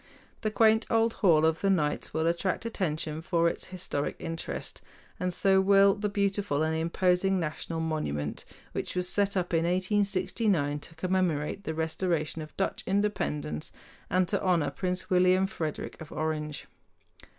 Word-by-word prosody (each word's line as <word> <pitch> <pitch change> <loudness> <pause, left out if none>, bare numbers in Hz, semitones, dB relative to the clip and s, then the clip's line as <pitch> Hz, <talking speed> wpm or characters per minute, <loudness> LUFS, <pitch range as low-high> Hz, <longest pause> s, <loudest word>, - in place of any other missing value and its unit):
The 215 - 0
quaint 220 +1 +4
old 225 0 +3
Hall 160 -6 +5
of 160 0 +1
the 195 - +2
Knights 155 -6 0
will 160 0 0
attract 170 +5 0
attention 160 -7 -2
for 170 -1 +2
its - - -2
historic 170 -6 -3
interest, 165 0 -5 0.4
and 180 0 0
so 190 +1 +3
will 195 0 +6
the 210 +1 -2
beautiful 200 -6 0
and 160 0 0
imposing 180 +3 +2
national 165 0 -3
monument, 115 - -2 0.3
which - - -4
was 180 0 0
set 200 +1 +1
up 180 -1 -1
in 165 0 +3
1869 185 -3 +1
to 165 - -12
commemorate 180 0 -1
the 160 - -3
restoration 160 -1 -1
of 155 - -10
Dutch 195 - -1
independence 75 - -1 0.4
and 185 0 +2
to - - 0
honor 175 -6 +2
Prince 180 0 -3
William 185 +1 +4
Frederick 160 -7 -5
of 155 - -9
Orange. 155 -1 -3
180 Hz, 150 wpm, -29 LUFS, 160-195 Hz, 0.4 s, will